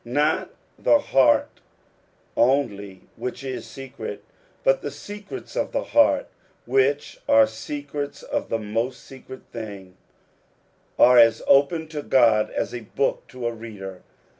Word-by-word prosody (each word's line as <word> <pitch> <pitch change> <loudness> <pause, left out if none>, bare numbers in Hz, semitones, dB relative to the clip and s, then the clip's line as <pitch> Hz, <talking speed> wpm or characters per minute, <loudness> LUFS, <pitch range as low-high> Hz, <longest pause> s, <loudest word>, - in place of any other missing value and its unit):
Not 145 +6 0 0.3
the 295 - +5
beait 135 - +2 0.7
only 100 -7 +1 0.2
which 125 +1 -5
is 130 -1 -5
secret, 135 0 -8 0.4
but - - +3
the - - -4
secrets 205 - -9
of - - -2
the - - 0
heart, 290 -1 +3 0.4
which 135 +3 +1
are 110 0 +7
secrets 145 +6 -6
of - - -3
the 115 - 0
mot 115 +4 -2
x - - -17
secret 130 +2 -12
thing, 100 -5 -8 1.0
are 125 0 +7
as 115 -1 +5
open 150 +4 +3
to 150 -2 -5
God 115 -6 +3
as - - -3
a 120 - -4
book 125 +5 -2
to 125 -1 -8
a 120 - +1
reader. 100 -5 -9
125 Hz, 140 wpm, -24 LUFS, 110-145 Hz, 1.0 s, are